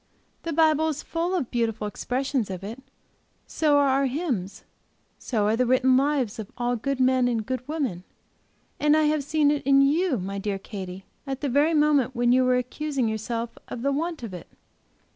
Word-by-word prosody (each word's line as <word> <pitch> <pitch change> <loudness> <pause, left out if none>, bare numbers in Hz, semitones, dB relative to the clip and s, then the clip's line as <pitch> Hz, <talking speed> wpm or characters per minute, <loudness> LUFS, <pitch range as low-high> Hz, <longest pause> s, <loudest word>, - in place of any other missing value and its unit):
The 335 - -4
Bible 315 0 +3
is 305 -2 -3
full 340 +3 -2
of 290 -10 -2
beautiful 225 -3 -1
expressions 250 +2 -2
of 185 0 -6
it; 225 +6 -7 0.6
so 300 -2 +2
are 285 -1 +4
our 270 +1 +2
hymns; 250 - -3 0.6
so 215 -5 -1
are 215 +2 +2
the 250 +1 +1
written 255 +1 +4
lives 270 -5 +1
of 210 - -7
all 245 0 0
good 275 +3 -2
men 255 -1 +3
and 230 -3 -1
good 255 0 -3
women; 270 - -3 0.8
and 300 +1 +4
I 310 - +3
have 300 -1 +1
seen 290 0 +2
it 295 - 0
in 275 +1 +4
you, 305 +1 +2
my 195 +1 -4
dear 200 0 -2
Katy, 190 -1 -8 0.2
at 270 -1 -4
the 285 - -1
very 295 +5 +3
moment 290 -4 +3 0.2
you 255 0 +4
were 255 0 +3
accusing 260 +1 -2
yourself 230 +2 -4
of 240 - -6
the 280 - +2
want 320 0 -2
of 220 -5 -6
it. 180 - -8
260 Hz, 190 wpm, -25 LUFS, 230-295 Hz, 0.8 s, are